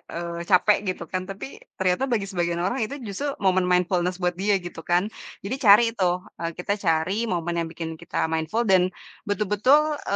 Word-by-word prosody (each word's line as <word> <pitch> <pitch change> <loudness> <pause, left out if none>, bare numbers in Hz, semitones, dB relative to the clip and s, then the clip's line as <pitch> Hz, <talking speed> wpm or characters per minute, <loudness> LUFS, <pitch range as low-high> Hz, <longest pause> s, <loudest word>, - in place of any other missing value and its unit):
eee 170 0 -4
capek 200 +2 +5
gitu 185 -2 -2
kan. 185 - -1
Tapi 195 +7 -8 0.2
ternyata 185 +5 +1
bagi 235 -6 0
sebagian 175 -2 -1
orang 200 +9 -1
itu 275 - -6
justru 205 +9 -3 0.2
momen 185 -1 +3
mindfulness 180 0 +1
buat 180 0 +1
dia 200 +1 +2
gitu 175 -1 -8
kan. 180 +5 +2 0.3
Jadi 200 +7 -2
cari 215 0 +7
tuh, 180 -1 +1 0.2
e - - -6
kita 180 +3 -1
cari 185 +6 0
momen 175 -4 -1
yang 165 - -2
bikin 165 0 -5
kita - - -2
mindful 160 +9 0
dan 190 -4 +4 0.4
betul-betul 220 +10 +2
e 200 - 0
185 Hz, 185 wpm, -24 LUFS, 175-210 Hz, 0.4 s, cari